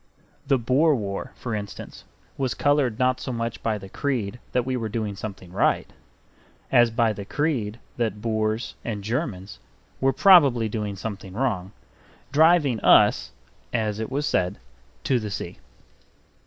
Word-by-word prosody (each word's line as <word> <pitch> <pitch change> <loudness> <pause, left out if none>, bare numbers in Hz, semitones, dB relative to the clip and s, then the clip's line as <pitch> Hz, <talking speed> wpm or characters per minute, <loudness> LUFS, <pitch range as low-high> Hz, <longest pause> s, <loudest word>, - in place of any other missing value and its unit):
The 135 - +4
Boer 135 +6 +3
War, 100 -4 -4
for 120 - -5
instance, 100 -1 -7 0.3
was 130 -3 -1
colored 145 -6 +2
not 125 0 +2
so 130 - -4
much 115 -1 -3
by 110 -2 0
the 95 -1 -10
creed 120 -1 -2
that 125 -1 +1
we 130 0 -1
were 115 -3 -3
doing 105 -2 -3
something 95 -3 -8
right, 95 - +1 0.8
as 120 -2 +6
by 115 -1 +1
the 100 0 -7
creed 120 -4 -1 0.2
that 110 -4 -1
Boers 110 +1 -1
and 105 -4 -4
Germans 105 - -3 0.4
were 135 0 +3
probably 140 - +6
doing 105 -2 -3
something 100 -2 -6
wrong; 100 -6 -1 0.6
driving 150 -5 +4
us - - +5 0.4
(as 110 -3 -1
it 110 - -3
was 140 +3 -1
said) 90 -9 0 0.5
to 130 -3 +2
the 110 -2 -5
sea. 90 -3 -6
115 Hz, 150 wpm, -24 LUFS, 105-130 Hz, 0.8 s, as